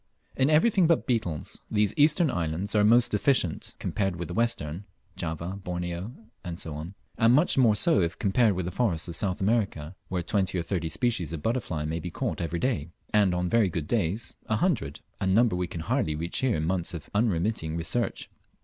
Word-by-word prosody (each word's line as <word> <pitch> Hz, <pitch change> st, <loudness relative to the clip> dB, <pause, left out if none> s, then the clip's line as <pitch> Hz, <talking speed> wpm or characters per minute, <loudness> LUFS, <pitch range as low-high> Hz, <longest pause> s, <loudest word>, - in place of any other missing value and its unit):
In 135 Hz, +2 st, +2 dB
everything 175 Hz, +3 st, +4 dB
but 165 Hz, -1 st, +2 dB
beetles, 100 Hz, -, -2 dB
these 105 Hz, -1 st, +2 dB
eastern 150 Hz, +1 st, +4 dB
islands 85 Hz, +4 st, -2 dB
are 105 Hz, -1 st, +4 dB
very 115 Hz, +4 st, +6 dB
deficient 105 Hz, -, 0 dB
compared 95 Hz, -3 st, -1 dB
with 85 Hz, -1 st, -5 dB
the -, -, -4 dB
western 95 Hz, -5 st, -1 dB, 0.3 s
(Java, 85 Hz, +5 st, -4 dB
Borneo, 90 Hz, +3 st, -4 dB, 0.4 s
&c.), 85 Hz, -, -6 dB, 0.5 s
and 115 Hz, 0 st, +5 dB
much 155 Hz, +5 st, +4 dB
more 120 Hz, -5 st, +5 dB
so 160 Hz, -, +3 dB
if 85 Hz, -1 st, -1 dB
compared 105 Hz, +2 st, +3 dB
with 90 Hz, -1 st, -3 dB
the 90 Hz, -, -3 dB
forests 90 Hz, -6 st, 0 dB
of 85 Hz, -, -6 dB
South 95 Hz, 0 st, -1 dB
America, 95 Hz, -6 st, 0 dB
where 90 Hz, -2 st, -2 dB
twenty 95 Hz, 0 st, 0 dB
or 85 Hz, -, -1 dB
thirty 85 Hz, -2 st, -2 dB
species 90 Hz, -, -1 dB
of 75 Hz, -2 st, -5 dB
butterflies 95 Hz, -11 st, -1 dB
may 80 Hz, +2 st, -2 dB
be 90 Hz, -, -5 dB
caught 90 Hz, -, -3 dB
every 85 Hz, 0 st, -2 dB
day, 85 Hz, -, -1 dB, 0.2 s
and 100 Hz, -4 st, +4 dB
on 90 Hz, 0 st, 0 dB
very 110 Hz, 0 st, +3 dB
good 80 Hz, -3 st, -4 dB
days 105 Hz, 0 st, -1 dB
a 110 Hz, -, +1 dB
hundred, 110 Hz, -, 0 dB, 0.2 s
a 95 Hz, -, -1 dB
number 110 Hz, +2 st, +4 dB
we 90 Hz, 0 st, -1 dB
can 85 Hz, -, -6 dB
hardly 100 Hz, -, 0 dB
reach 85 Hz, +3 st, -2 dB
here 130 Hz, -7 st, +1 dB
in 75 Hz, -, -1 dB
months 90 Hz, +1 st, -1 dB
of 80 Hz, -, -8 dB
unremitting 90 Hz, -6 st, 0 dB
search. 120 Hz, +7 st, -1 dB
95 Hz, 195 wpm, -27 LUFS, 85-115 Hz, 0.5 s, very